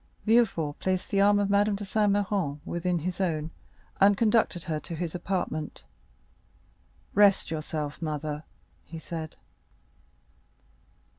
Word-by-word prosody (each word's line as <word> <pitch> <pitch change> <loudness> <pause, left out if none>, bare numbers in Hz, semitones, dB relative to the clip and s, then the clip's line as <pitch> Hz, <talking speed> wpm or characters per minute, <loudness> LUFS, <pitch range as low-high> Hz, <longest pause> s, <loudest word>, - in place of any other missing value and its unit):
Villefort 210 -10 +2
placed 185 -1 -1
the 195 - +3
arm 205 +1 +5
of 200 -1 +1
Madame 205 +1 +3
de 200 +1 -5
Saint 210 +1 +2
Méran 195 -7 0
within 175 +1 -1
his 180 +3 -3
own, 160 -3 -1 0.5
and 200 0 +5
conducted 215 -6 +2
her 155 0 -2
to 170 +2 -7
his 165 0 -4
apartment. 175 -4 -3 1.3
"Rest 200 -4 +4
yourself, 155 -1 -4
mother," 150 -1 -3 0.4
he 165 - -9
said. 160 -1 -6
180 Hz, 125 wpm, -28 LUFS, 155-200 Hz, 1.3 s, arm